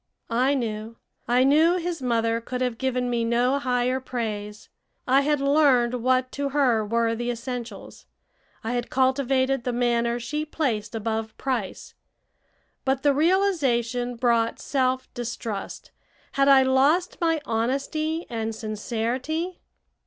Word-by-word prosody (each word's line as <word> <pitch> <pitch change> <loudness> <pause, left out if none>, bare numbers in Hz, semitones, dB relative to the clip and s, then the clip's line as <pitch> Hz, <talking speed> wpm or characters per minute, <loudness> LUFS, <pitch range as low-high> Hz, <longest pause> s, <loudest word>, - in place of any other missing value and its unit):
I 260 +4 +3
knew. 225 -2 -4 0.3
I 245 +1 +4
knew 315 +6 +4
his 345 -3 -3
mother 230 -2 0
could 250 +2 -5
have 250 -2 -2
given 255 -1 0
me 240 -1 0
no 245 +4 +2
higher 250 -1 0
praise. 215 -5 -5 0.4
I 265 +2 +5
had 295 0 +1
learned 270 -4 +3
what 255 +1 +1
to 280 0 -2
her 260 -6 +2
were 230 +2 +1
the 240 +1 -3
essentials; 245 0 -6 0.6
I 225 - -2
had 245 -1 -2
cultivated 260 0 +1
the 250 - -1
manner 235 0 +1
she 300 +6 -3
placed 240 -9 -2
above 220 0 -3
price. 245 -8 -3 0.9
But 265 0 0
the 290 -1 +4
realization 270 - +1
brought 230 -1 +1
self 260 -1 0
distrust. 230 -4 -5 0.4
Had 275 0 +2
I 270 -1 +7
lost 280 +9 +2
my 325 -1 +2
honesty 280 +8 -1
and 225 -2 -3
sincerity? 240 - -3
250 Hz, 130 wpm, -25 LUFS, 230-275 Hz, 0.9 s, I